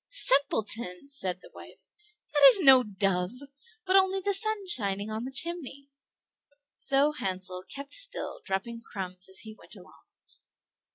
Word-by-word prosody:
"Simpleton!" 235 - 0
said 185 -9 -3
the - - -15
wife, - - -15 0.5
"that - - +2
is 435 -6 +4
no 265 -4 +8
dove, 195 -4 -1 0.6
but 375 0 +2
only 385 0 +3
the 400 +1 -1
sun 430 0 0
shining 205 - 0
on 220 +2 -4
the 265 - -6
chimney." 280 -3 0 0.9
So 275 +2 +1
Hansel 185 -8 -4
kept 280 +1 -8
still - - -4
dropping 220 +4 -4
crumbs 185 -4 -7
as 190 0 -2
he 220 -1 -10
went - - -11
along. - - -18
250 Hz, 140 wpm, -28 LUFS, -, 0.9 s, no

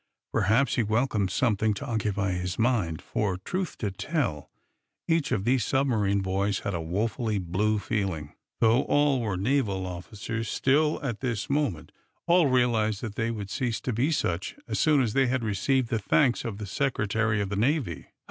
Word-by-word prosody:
Perhaps 110 +8 +2
he - - +4
welcomed 110 -2 +1
something 110 -1 +1
to 140 - -6
occupy 105 -5 -1
his 90 0 -3
mind; 105 - 0
for, 100 -4 -1
truth 180 - -4
to 105 -4 -2
tell, 105 - -2 0.6
each 165 -3 +1
of 95 - 0
these 125 -1 +2
submarine 110 -7 +1
boys 95 +1 0
had 100 - -3
a 85 - -2
woefully 110 +6 -1
"blue" 100 +4 0
feeling. 95 -9 -2 0.3
Though 115 +3 +5
all 145 -3 +3
were 105 -5 -2
naval 100 -3 0
officers, 105 +5 -5
still, 150 +3 +2
at 120 -6 -3
this 120 -2 -2
moment, 140 - -1 0.3
all 175 -2 +5
realized 115 -5 +2
that 110 -4 -5
they 110 +1 -1
would 105 -4 -5
cease 120 -4 -1
to 125 - -2
be 130 +8 +1
such 90 - -1
as - - -2
soon 150 -4 +4
as 110 -3 -1
they 135 -1 +3
had 130 -1 0
received 115 +5 +1
the 115 - 0
thanks 125 +4 +2
of 110 -4 -4
the 105 - -5
Secretary 110 -2 0
of 100 -1 -1
the 100 - -2
Navy. 115 - 0
110 Hz, 175 wpm, -27 LUFS, 100-130 Hz, 0.6 s, Though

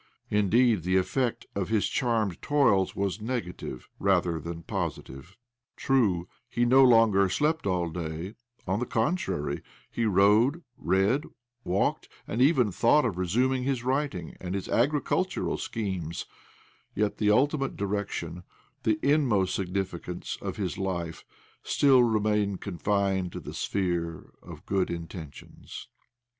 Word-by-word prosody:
Indeed, 105 +1 +3
the 90 +3 +1
effect 120 +6 0
of 100 -2 -2
his 110 -2 +2
charmed 115 -8 0
toils 120 -11 +2
was 100 +1 -2
negative 110 - -5
rather 90 -4 +2
than 85 +1 -7
positive. 75 +6 -5 0.4
True, 100 -10 +1 0.2
he 120 -1 +1
no 130 +3 +6
longer 115 -6 +5
slept 150 - 0
all 90 -2 0
day— 80 +3 -5 0.3
on 95 +3 0
the 125 - -2
contrary, 110 - -1 0.3
he 115 - -1
rode, 110 - +4
read, 100 - +1 0.4
walked, 95 +2 0 0.2
and 115 - -2
even 130 -6 +4
thought 120 +10 +3
of 95 -6 -2
resuming 125 +9 +1
his 130 -2 -1
writing 130 - -2
and 90 +1 -4
his 100 - -4
agricultural 150 +8 0
schemes; 95 -7 -4 0.7
yet 105 0 0
the 105 - +2
ultimate 135 +5 +2
direction, 100 -3 -3 0.4
the 110 -1 +1
inmost 125 -11 +2
signi 95 +1 -1
ficance, 90 0 -7
of - - -4
his 95 -4 -3
life 85 -4 -3 0.4
still 135 -3 +4
remained 105 -3 +1
confined 95 -1 -1
to - - -5
the - - -8
sphere 85 -4 -2
of - - -12
good 95 -1 0
intentions. 85 -3 -8
100 Hz, 130 wpm, -28 LUFS, 90-120 Hz, 0.7 s, no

